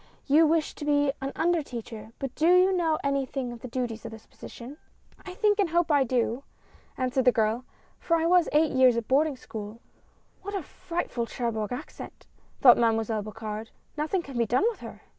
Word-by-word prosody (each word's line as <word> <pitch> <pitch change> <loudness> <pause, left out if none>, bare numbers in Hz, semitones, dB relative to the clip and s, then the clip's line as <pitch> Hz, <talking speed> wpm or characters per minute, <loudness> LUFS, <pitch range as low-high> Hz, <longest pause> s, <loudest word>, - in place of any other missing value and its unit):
You 310 +3 +5
wish 320 0 +1
to - - -9
be 290 -1 +2
an 270 +1 -3
under 340 +1 +1
teacher, 230 -5 -8
but 270 -2 -5
do 320 - +1
you 365 +2 +5
know 325 -3 +1
anything 270 -2 -2
of 240 - -9
the 255 - -8
duties 240 -2 -4
of 230 - -6
this 225 -1 -12
position?" 255 +5 -11 0.2
" - - -27
I 365 - -7
think 420 -1 +2
and 390 -4 +2
hope 340 0 +1
I 285 -2 +4
do," 245 0 -1 0.6
answered 255 0 0
the 250 - +7
girl, 225 +2 0 0.2
" - - -35
for 335 - +1
I 325 0 +1
was 350 -1 +4
eight 305 0 +3
years 255 -2 +4
at 230 -2 -3
boarding 285 +1 +2
school." 215 -1 -8 0.6
"What 405 +1 -6
a 385 - -3
frightful 290 -8 -4
Cherbourg 225 -4 -3
accent!" 245 - -8 0.4
thought 250 -3 +8
Mademoiselle 225 -2 +1
Bocard; 215 +1 -6 0.3
"Nothing 310 +5 -1
can 270 -5 -6
be 230 - +2
done 245 - +2
with 450 - -13
her - - -10
265 Hz, 200 wpm, -27 LUFS, 230-320 Hz, 0.6 s, thought